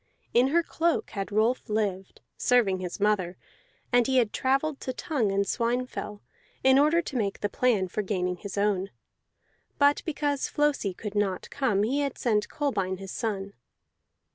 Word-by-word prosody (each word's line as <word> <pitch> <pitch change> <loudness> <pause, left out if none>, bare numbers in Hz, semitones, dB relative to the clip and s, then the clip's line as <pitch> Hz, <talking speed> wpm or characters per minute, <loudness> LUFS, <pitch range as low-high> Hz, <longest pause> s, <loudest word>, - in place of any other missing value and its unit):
In 245 +2 +5
her 335 +5 +3
cloak 330 +1 0
had 195 0 -4
Rolf 220 +4 +1
lived, 200 -3 -2
serving 220 -7 +2
his 180 +1 -5
mother, 200 -4 +1 0.6
and 245 -1 +5
he 265 -1 +2
had 230 -4 +2
travelled 275 +3 0
to 255 - -3
Tongue 250 -6 -1
and 200 0 +1
Swinefell 235 -2 -2 0.4
in 265 +1 +6
order 315 +4 +4
to 285 - -7
make 205 -5 -1
the 205 - 0
plan 215 -5 +1
for 200 - -2
gaining 180 -3 -1
his 200 +2 -7
own; 200 -2 +1 0.9
but 285 0 +4
because 290 -3 -1
Flosi 290 -11 0
could 210 0 -6
not 205 -3 -1
come 210 -8 +1
he 260 +7 +1
had 280 -2 -2
sent 210 -4 +1
Kolbein 195 -11 -1
his 195 -1 -8
son. 200 -4 -3
220 Hz, 165 wpm, -27 LUFS, 195-265 Hz, 0.9 s, in